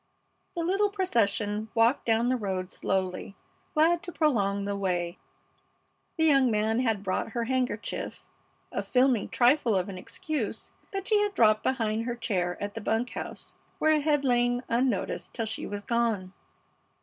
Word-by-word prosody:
The 340 - -1
little 390 +4 +2
procession 220 - 0
walked 230 +4 +3
down 230 +2 +3
the 255 - +2
road 190 -5 -3
slowly, 190 +1 -2 0.4
glad 330 +2 +4
to 365 - -7
prolong 200 - +1
the 200 0 -2
way. 180 -2 -2 1.0
The 320 - +3
young 275 -4 +5
man 220 +1 +1
had 225 -5 0
brought 190 +3 -2
her 235 - 0
handkerchief, 250 -3 -2 0.5
a - - -1
filmy 250 -4 +2
trifle 245 -2 +3
of 185 0 0
an 185 -2 -6
excuse 235 0 -4 0.2
that 390 -1 -4
she 425 -2 +4
had 410 -1 -1
dropped 215 - +5
behind 225 -3 0
her 240 -1 -2
chair 185 -7 -1
at 205 0 -4
the 225 - -6
bunk 225 +4 0
house, - - -6 0.2
where 310 - +3
it 305 -1 +3
had 295 -1 +2
lain 245 0 +2
unnoticed 235 -2 -1
till 230 - -1
she 220 +1 -4
was 205 0 -5
gone. 220 -5 0
230 Hz, 160 wpm, -28 LUFS, 205-265 Hz, 1.0 s, young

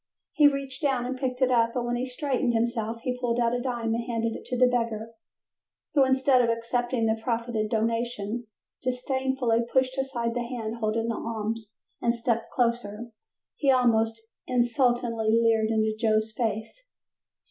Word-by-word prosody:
He 300 -2 +6
reached 275 -2 -2
down 265 -4 +1
and 255 +1 -2
picked 255 0 -1
it 255 - +3
up, 230 -1 +3
and 245 -1 -1
when 240 0 -1
he 250 +2 -2
straightened 255 -1 -1
himself 230 0 -1
he 250 -1 -2
pulled 245 -1 0
out 235 0 +2
a 245 - -1
dime 240 -3 -1
and 235 +1 -1
handed 230 -1 -1
it - - -9
to 250 - -3
the 255 - +6
beggar, 230 -3 -1 0.8
who, 280 - +5
instead 265 0 +4
of 235 - +2
accepting 235 +1 0
the 220 0 +1
proffered 235 0 -2
donation, 230 0 -1 0.3
disdainfully 255 -1 0
pushed 260 0 +1
aside 240 -4 -1
the 245 - -1
hand 235 -2 -4
holding 225 0 -1
the 230 - 0
alms 220 -1 -4 0.3
and 235 0 +2
stepping 230 -1 0
closer 235 -2 -1 0.5
he 280 - +1
almost 225 -3 +3 0.3
insultingly 240 -2 +2
leered 225 -1 +3
into 220 -1 +1
Joe's 220 -1 +1
face. 230 - -3
235 Hz, 165 wpm, -27 LUFS, 225-255 Hz, 0.8 s, He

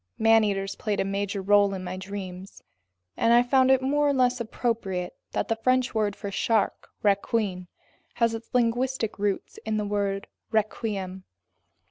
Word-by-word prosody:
Man 225 0 +5
eaters 195 -1 -1
played 210 -2 -2
a - - +1
major 200 0 -2
role 200 0 +4
in 185 - -6
my 180 0 -4
dreams. 190 -1 -8 0.5
And 230 - +3
I 240 +1 +6
found 260 +1 +3
it 265 -1 +4
more 290 +2 +2
or - - +2
less 250 -2 +2
appropriate 220 -6 -2 0.2
that - - -1
the 225 - +1
French 255 +2 +1
word 210 -2 0
for 200 -2 -6
shark, 215 +1 0 0.2
requin, 200 -2 0 0.5
has 230 -1 +2
its 225 0 -7
linguistic 245 -2 0
roots 200 -1 -2
in 220 -1 -1
the 210 - -1
word 200 -1 -1 0.2
requiem. 205 -4 -2
210 Hz, 160 wpm, -26 LUFS, 195-235 Hz, 0.5 s, I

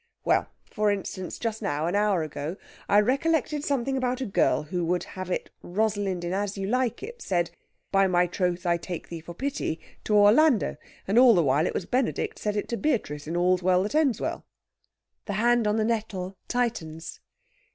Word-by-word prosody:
"Well! - - +3 0.2
For 210 0 +1
instance, 190 -2 -3
just 225 -2 -3
now 145 +2 -1
an 175 - -1
hour 205 -4 +2
ago 155 +3 -5 0.3
I 205 - +6
recollected 290 +5 +1
something 270 -2 0
about 255 -1 0
a 265 - -2
girl 195 -6 +2
who 175 +3 -3
would 175 +1 0
have 185 -1 -7
it 180 - -3
Rosalind 200 -2 -1
in 175 +1 -2
As 200 +1 -2
You 195 - -2
Like 250 - 0
It 470 +2 -8
said, 175 -3 0 0.4
'By 195 -1 +4
my 180 -1 +3
troth 180 0 -1
I 170 -1 +3
take 175 0 -7
thee 170 - -5
for 170 +1 -10
pity,' 265 - -2 0.3
to 210 - +2
Orlando. 225 +5 +5 0.3
And 205 +5 +4
all 250 -3 +8
the 170 - +4
while 145 +4 +2
it - - -3
was 180 - -2
Benedict 255 +4 -1
said 210 -1 -2
it 205 - -2
to 235 - -1
Beatrice 155 - -1
in 170 +2 -2
All's 180 +1 +3
Well 185 0 +3
that 210 - -3
Ends 295 -7 +2
Well." - - -3 0.8
The 205 - -3
hand 235 +2 +3
on 210 - +2
the 215 - +2
nettle 205 -5 -2
tightens. 165 -10 -2
200 Hz, 195 wpm, -26 LUFS, 175-235 Hz, 0.8 s, all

